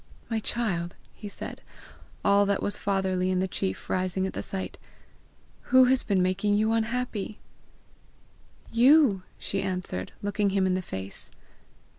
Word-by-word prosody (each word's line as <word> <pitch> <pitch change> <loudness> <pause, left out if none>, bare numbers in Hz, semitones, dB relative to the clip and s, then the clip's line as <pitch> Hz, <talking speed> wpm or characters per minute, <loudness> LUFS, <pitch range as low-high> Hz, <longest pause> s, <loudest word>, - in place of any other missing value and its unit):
"My 225 - +1
child!" 190 -7 -2 0.2
he 210 - -9
said, 200 - -7 0.6
all 200 0 +5
that 200 - 0
was 205 - +5
fatherly 190 -2 0
in 185 - +1
the 190 - +1
chief 95 - -3
rising 185 0 0
at 190 - -3
the - - -3
sight, 190 -1 -5 0.9
"who 260 0 +6
has 260 +1 +3
been 195 -4 +1
making 195 +3 +1
you 215 +2 +2
unhappy?" 225 -2 -1 1.3
"You," 245 -3 +5 0.2
she 195 - -2
answered, 180 - -2
looking 205 0 +1
him 195 -1 +1
in 185 - +2
the 185 - 0
face. 95 - -6
195 Hz, 145 wpm, -27 LUFS, 185-220 Hz, 1.3 s, who